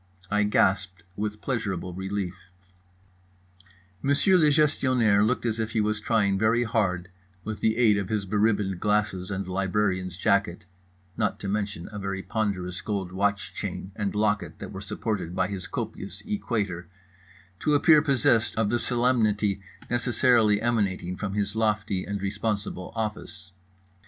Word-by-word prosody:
I 105 0 +3
gasped 95 -4 +1
with 105 +1 -3
pleasurable 95 -8 -2
relief. 95 0 -3 1.7
Monsieur 145 +8 +4
le 155 -4 +5
Gestionnaire 130 -8 +3
looked 120 +3 0
as 115 -1 -1
if 110 0 -2
he 110 - +1
was 105 0 0
trying 100 -4 +2
very 115 +3 +3
hard, 95 -6 -1 0.3
with 110 0 -5
the 110 0 +1
aid 110 -4 +4
of 100 -1 -4
his 105 -2 -1
beribboned 100 -2 +1
glasses 105 -3 0
and 100 -2 -3
librarian's 95 -1 -1
jacket 100 -4 +1 0.5
(not 105 -3 0
to 100 - -4
mention 100 -3 -2
a 105 - -6
very 95 -1 -3
ponderous 95 -5 -2
gold 100 -4 -3
watch 100 +2 -1
chain 95 - -5
and 100 0 -2
locket 105 -1 0
that - - -8
were - - -7
supported 95 -6 -3
by 90 -1 +1
his 95 -3 -5
copious 110 -4 -6
equator) 105 - -2 0.7
to 150 -1 +2
appear 150 +1 +6
possessed 120 -6 +2
of 110 -2 +1
the 120 - +2
solemnity 110 -6 +1 0.3
necessarily 120 -3 +3
emanating 100 -6 0
from 100 +1 -4
his 105 0 -1
lofty 105 -3 0
and 100 -1 -4
responsible 100 -2 -3
office. 105 -3 -5
105 Hz, 145 wpm, -26 LUFS, 95-110 Hz, 1.7 s, appear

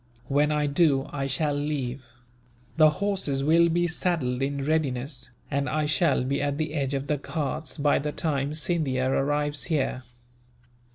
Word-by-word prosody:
When 145 +2 +2
I 150 0 +1
do, 145 -1 +2
I 135 -1 -2
shall 145 +2 +1
leave. 140 -3 -3 0.7
The 155 -1 +7
horses 155 -5 -1
will 170 +3 +4
be 175 +1 +1
saddled 160 -7 0
in 140 0 -1
readiness, 140 -3 -1 0.2
and 140 0 0
I 155 0 0
shall 150 -3 +2
be 135 +2 -1
at 145 0 -1
the 155 -1 -2
edge 140 -3 -1
of 135 0 -2
the 150 -1 -1
Ghauts 155 +2 -4
by 145 -1 +3
the 150 +1 -2
time 145 -2 -1
Scindia 150 -6 0
arrives 145 +2 0
here. 140 -5 -1
145 Hz, 160 wpm, -26 LUFS, 135-155 Hz, 0.7 s, The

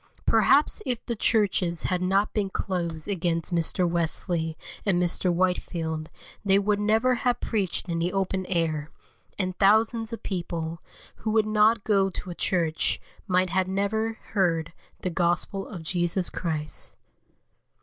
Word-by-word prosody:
Perhaps 295 +2 +4
if 250 -4 -3
the 235 - -1
churches 195 -6 +1
had 180 -1 0
not 195 +3 +2
been 205 -3 0
closed 170 -5 -3
against 175 -3 -1
Mr. 170 +1 +2
Wesley 165 -1 0 0.3
and 190 -4 +2
Mr. 180 +1 +1
Whitefield 170 -3 -1 0.3
they 195 -1 +4
would 205 +1 +1
never 220 +5 +3
have 245 0 0
preached 200 -6 -1
in 170 -1 -1
the 175 +2 0
open 190 -1 -1
air, 160 -4 0 0.5
and 185 -2 -1
thousands 220 +3 +3
of 230 - -6
people, 170 -3 -4 0.4
who 220 - -3
would 215 0 +3
not 215 0 +3
go 195 -2 +3
to 185 0 -6
a - - -4
church, 170 -3 0 0.3
might 185 -2 +2
never 200 +3 0
have - - -21 0.2
heard 170 -5 +1 0.3
the 185 - -2
Gospel 175 +3 0
of 175 -6 -8
Jesus 175 +2 0
Christ. 155 -3 -3
185 Hz, 145 wpm, -26 LUFS, 170-210 Hz, 0.5 s, Perhaps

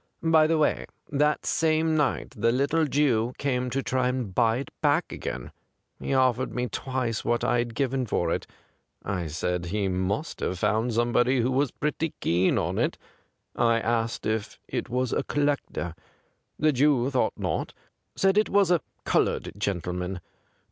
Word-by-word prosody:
' - - -30
By 160 -1 +5
the 165 0 +2
way, 155 - +1 0.2
that 150 +1 +1
same 160 0 +2
night 150 -3 0
the 115 +1 +2
little 140 +6 +2
Jew 125 -5 +2
came 125 -3 -1
to 135 +2 -2
try 130 -1 +1
and 125 -6 -2
buy 115 +3 +3
it 135 - -6
back 150 +2 +2
again. - - -5 0.5
He - - -4
offered 130 -1 +2
me 125 - 0
tAvice 130 -4 -2
what 120 0 0
I 120 - +2
had 120 -1 -2
given 130 -2 0
for - - 0
it. - - -2 0.6
I 90 -4 -2
said 85 +3 -2
he 100 +3 -1
must 95 - -2
have 95 - -2
found 110 +5 +1
somebody 120 +2 +2
who 125 +3 +1
was 135 +1 +2
pretty 150 +3 -2
keen 90 +2 +2
on - - -1
it. - - 0 0.6
I 115 -1 +3
asked 115 0 -1
if 110 -1 -2
it - - -3
was 125 +1 -1
a - - +1
collector. 140 - -1 0.6
The 155 0 +3
Jew 135 -1 +3
thought 130 - 0
not; - - -2 0.4
said 195 +1 +3
it 215 - +1
was 200 -3 +3
a 175 -4 +3 0.2
coloured - - +1
gentle 95 -4 -2
man. 90 +1 -3
125 Hz, 170 wpm, -26 LUFS, 110-145 Hz, 0.6 s, By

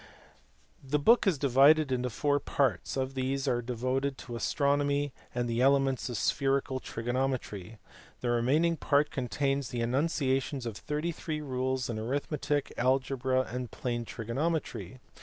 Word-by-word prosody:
The 135 +2 0
book 225 +10 +4
is 180 -6 +3
divided 140 +2 +5
into 125 0 0
four 145 +5 +1
parts: 130 -7 0
of 130 0 -1
these 135 +1 -1
three - - +2
are 120 - -1
devoted 130 +3 -1
to 120 - -7
astronomy 145 +2 +1 0.2
and 120 -1 0
the 115 +1 0
elements 135 -1 +3
of 120 - -3
spherical 135 +2 +1
trigono 120 +3 -1
metry; 110 -5 -5 0.4
the 120 - 0
remaining 150 +8 +2
part 145 0 +2
contains 135 0 -1
the 120 - -3
enunciations 135 0 0
of 115 -3 -4
thirty 150 +9 -2
three 155 -2 -4
rules 130 -2 -1
in 115 -2 -3
arithmetic, 145 +4 -1
algebra, 130 0 +1
and 125 -1 -5
plane 120 0 -3
trigonometry. 130 +5 -3
130 Hz, 145 wpm, -30 LUFS, 125-145 Hz, 0.4 s, divided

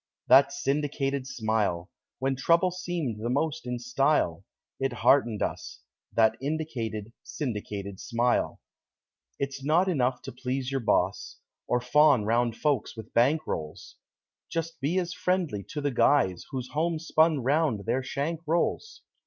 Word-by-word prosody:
That 140 +1 +7
syndicated 140 -1 -1
smile! 110 -7 -1 0.3
When 135 +1 0
trouble 170 +7 +3
seemed 170 - -3
the 120 - -2
most 145 +2 -1
in 125 0 -2
style, 125 - +1 0.4
It 135 -1 -1
heartened 120 -4 +3
us - - -5 0.3
That 110 -1 +3
indicated, 120 -8 -3
Syndicated 105 -7 -5
Smile. 120 0 0 0.8
It's 135 -1 -4
not 165 +6 +3
enough 130 -8 0
to - - -6
please 130 +1 -3
your 135 - 0
boss 100 -3 0 0.3
Or 125 - +2
fawn 135 -2 +4
round 115 +1 +1
folks 140 -6 -1
with 110 0 -10
bankrolls; 120 - 0
Be - - -43
just 165 0 -2
as 175 +3 0
friendly 180 - -1
to 150 - -5
the 145 0 0
guys 125 -8 +2
Whose 130 -3 -5
homespun 160 -2 +1
round 135 - +1
their 130 - 0
shank 145 +5 -3
rolls. 170 - -1
135 Hz, 135 wpm, -27 LUFS, 115-155 Hz, 0.8 s, That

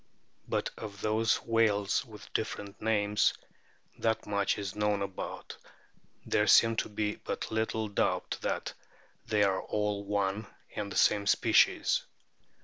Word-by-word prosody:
But - - -1
of 100 -2 -7
those 110 +1 +1
whales 110 -3 +2
with - - -13
different 100 0 -4
names 105 -2 +2 0.6
that 110 -1 0
much 100 -1 0
is 100 -2 -5
known 105 -1 +1
about, 100 -1 -6 0.7
there 105 - +2
seems 115 -1 +6
to - - -8
be 105 0 -2
but - - -5
little 110 0 -1
doubt 100 - -1
that - - -2 0.5
they 105 -2 +3
are 95 -1 +2
all 105 -1 -2
one 100 +1 -1 0.3
and 100 -1 -4
the - - -3
same 100 -1 +3
species. - - +4
105 Hz, 135 wpm, -30 LUFS, 100-110 Hz, 0.7 s, seems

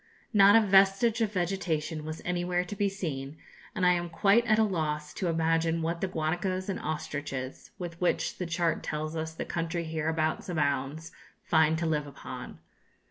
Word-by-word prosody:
Not 200 0 +7
a 225 - +8
vestige 195 +4 +4
of 220 -2 +1
vegetation 175 -4 -1
was 155 +1 -6
anywhere 180 0 0
to 195 - -6
be 200 0 +1
seen, 155 -7 -5 0.4
and 185 - +1
I 180 - +6
am 175 0 -2
quite 200 +7 +4
at 215 - +4
a 220 - +5
loss 150 -6 -2
to 190 - -2
imagine 165 0 +1
what 170 +1 -2
the 195 - +1
guanacos 185 +3 -2
and 195 - -2
ostriches, 140 -4 -4
with 175 -3 -7
which 180 - 0
the 180 - -2
chart 170 -1 0
tells 155 +1 -3
us 160 0 -4
the - - -4
country 170 0 -2
hereabouts 160 +1 -1
abounds, 145 -1 -1 0.3
find 160 0 +3
to 170 - -1
live 150 -2 0
upon. 140 - -8
165 Hz, 175 wpm, -29 LUFS, 155-185 Hz, 0.4 s, a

